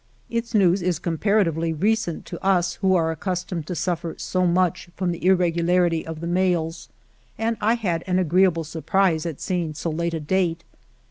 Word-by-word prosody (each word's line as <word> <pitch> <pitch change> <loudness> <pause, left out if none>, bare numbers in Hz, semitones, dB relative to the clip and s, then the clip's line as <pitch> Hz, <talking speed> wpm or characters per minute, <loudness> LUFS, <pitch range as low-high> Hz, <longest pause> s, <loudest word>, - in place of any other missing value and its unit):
Its 230 0 -2
news 190 -2 +4
is 175 -2 0
comparatively 170 -1 +1
recent 200 +2 0
to - - -8
us 180 -2 +2
who 190 -1 +3
are 165 -2 +2
accustomed 180 -2 -3
to 180 - -3
suffer 170 -2 -2
so 185 -1 0
much 175 0 +1
from 180 -2 -1
the 170 - -6
irregularity 175 -2 +2
of 160 -1 -6
the - - -4
mails, 175 -2 0 0.5
and 225 +1 0
I 225 +3 +3
had 180 -8 -2
an 180 0 +1
agreeable 180 -1 +3
surprise 165 +1 0
at 160 -4 -5
seeing 170 -4 -2
so 165 +2 -3
late 170 +1 -2
a - - -2
date. 165 +1 0
175 Hz, 175 wpm, -23 LUFS, 165-190 Hz, 0.5 s, news